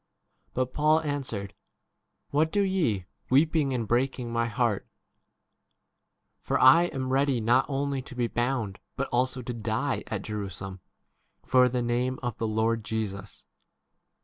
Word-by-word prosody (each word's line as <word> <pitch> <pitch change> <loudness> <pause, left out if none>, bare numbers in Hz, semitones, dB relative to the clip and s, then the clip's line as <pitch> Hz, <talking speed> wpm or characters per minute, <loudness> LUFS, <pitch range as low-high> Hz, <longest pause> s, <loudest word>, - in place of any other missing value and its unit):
But 130 0 -1
Paul 155 +1 +3
answered, 130 -10 -3 0.8
"What 155 +2 +2
do 205 - +2
ye, 160 - 0 0.2
weeping 145 +1 +3
and 120 -4 -1
breaking 125 0 0
my 115 0 +1
heart? 115 -2 0 1.5
for - - -1
I 135 +7 +7
am 130 -5 -3
ready 135 -2 +2
not 120 +4 +3
only 140 -1 -1
to 130 0 -11
be 125 -1 +1
bound 120 -4 -1 0.2
but 135 - -2
also 125 +1 0
to 125 - -4
die 115 +4 -1
at 105 -3 -3
Jerusalem 95 -3 -5 0.7
for 125 -1 +5
the 125 0 -1
14 - - -2
name 125 +2 0
of 120 -3 -2
the 115 - 0
Lord 110 +1 0
Jesus. 105 -2 -4
125 Hz, 145 wpm, -27 LUFS, 110-135 Hz, 1.5 s, I